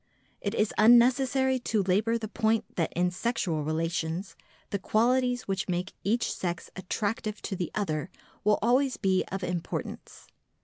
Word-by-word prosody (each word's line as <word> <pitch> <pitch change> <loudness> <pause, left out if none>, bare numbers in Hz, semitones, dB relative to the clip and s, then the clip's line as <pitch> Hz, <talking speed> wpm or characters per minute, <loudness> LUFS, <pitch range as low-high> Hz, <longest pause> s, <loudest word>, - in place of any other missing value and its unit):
It 205 +2 -2
is 210 -1 +1
unnecessary 255 +3 +5
to 220 -4 0
labour 210 +5 +2
the 220 -1 -5
point 220 0 +1
that 165 -3 0
in 180 +1 +1
sexual 180 -6 -1
relations 165 +3 -2 0.4
the 200 - -1
qualities 245 +4 +2
which 195 0 -2
make 180 +1 -2
each 230 +4 +1
sex 175 -2 -4
attractive 210 +3 -3
to 195 - -3
the 175 -3 -3
other 170 -5 -1 0.3
will 210 0 +4
always 255 +3 +3
be 190 -2 +2
of 195 0 -3
importance. 175 -1 -5
205 Hz, 145 wpm, -28 LUFS, 180-235 Hz, 0.4 s, unnecessary